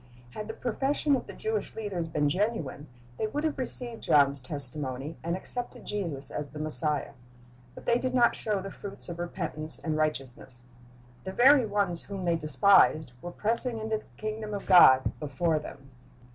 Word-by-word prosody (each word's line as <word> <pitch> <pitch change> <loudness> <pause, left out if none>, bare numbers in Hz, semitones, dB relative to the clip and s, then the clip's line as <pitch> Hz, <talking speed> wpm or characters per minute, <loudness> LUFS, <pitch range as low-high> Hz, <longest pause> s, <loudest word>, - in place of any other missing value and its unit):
Had 210 +10 -7
the 220 - -7
profession 275 +4 -1
of 260 - -5
the - - -9
Jewish 440 0 -4
leaders 195 -6 -4
been 150 -2 0
genuine, 165 - -2 0.3
they 220 - -1
would 290 +8 -4
have 310 -3 -2
received 245 -2 -3
John's 140 -1 +3
testimony, 135 +1 0
and 170 +1 -2
accepted 245 +5 -2
Jesus 165 -10 -5
as 150 -1 -5
the 150 - -11
Messiah. 155 0 -1 0.6
But - - -12
they 235 0 +2
did 255 0 -3
not 240 -2 +3
show 210 -3 -2
the 195 - -7
fruits 195 -2 -7
of 170 0 -7
repentance 155 -2 -1
and 155 -2 -3
righteousness. 135 -5 -4 0.6
The 190 - -6
very 260 +2 +5
ones 200 -5 +1
whom 195 -2 -6
they 170 -1 +1
despised 155 -2 +3
were 175 - -7
pressing 230 +6 +5
into 220 0 -3
the - - -19
kingdom 215 -1 -5
of 200 - -7
God 130 -8 +6
before 155 +2 -1
them. 135 -2 -12
180 Hz, 175 wpm, -27 LUFS, 150-220 Hz, 0.6 s, God